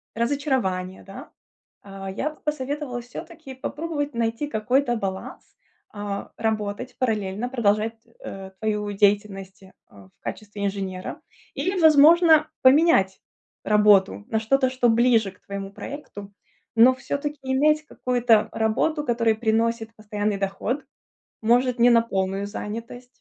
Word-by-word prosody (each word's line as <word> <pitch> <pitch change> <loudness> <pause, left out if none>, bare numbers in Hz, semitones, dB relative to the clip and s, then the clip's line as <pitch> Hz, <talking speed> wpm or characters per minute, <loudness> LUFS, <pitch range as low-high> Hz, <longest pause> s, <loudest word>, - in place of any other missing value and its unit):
разочарования, 235 -8 -1
да. 250 +10 -11 0.5
А, 195 -1 -8
я 285 +11 -2
бы 305 - -17
посоветовала 285 -3 -3
всё-таки 270 +4 -10
попробовать 290 +2 -4
найти 230 +4 -1
какой-то 245 +1 0
баланс, 190 -3 -6 0.4
а, 205 -1 -5
работать 215 +2 -3
параллельно, 215 -1 -1
продолжать, 220 -2 +1 0.3
э, 190 0 -7
твою 210 -1 -1
деятельность, 200 -1 0 0.3
а, 100 -1 -16
в - - -30
качестве 205 -1 -6
инженера. 195 -2 -4 0.3
Или, 375 +1 -1
возможно, 315 +1 +6
поменять 260 - +4 0.4
работу 205 -1 +4
на 220 - 0
что-то, 260 +4 +2
что 255 -2 +1
ближе 230 -3 +3
к 185 - -26
твоему 200 0 -6
проекту, 205 -4 -9 0.4
но 245 +3 +7
всё-таки 285 +3 -4
иметь 300 +4 +2
какую-то 245 -3 +2
работу, 255 +8 0
которая 230 -3 +2
приносит 225 0 0
постоянный 210 -1 -3
доход. 205 +8 -2 0.6
Может, 245 +3 +2
не 240 +1 +6
на 235 -1 +6
полную 195 -2 -2
занятость. 230 +4 -7
225 Hz, 120 wpm, -24 LUFS, 205-265 Hz, 0.6 s, но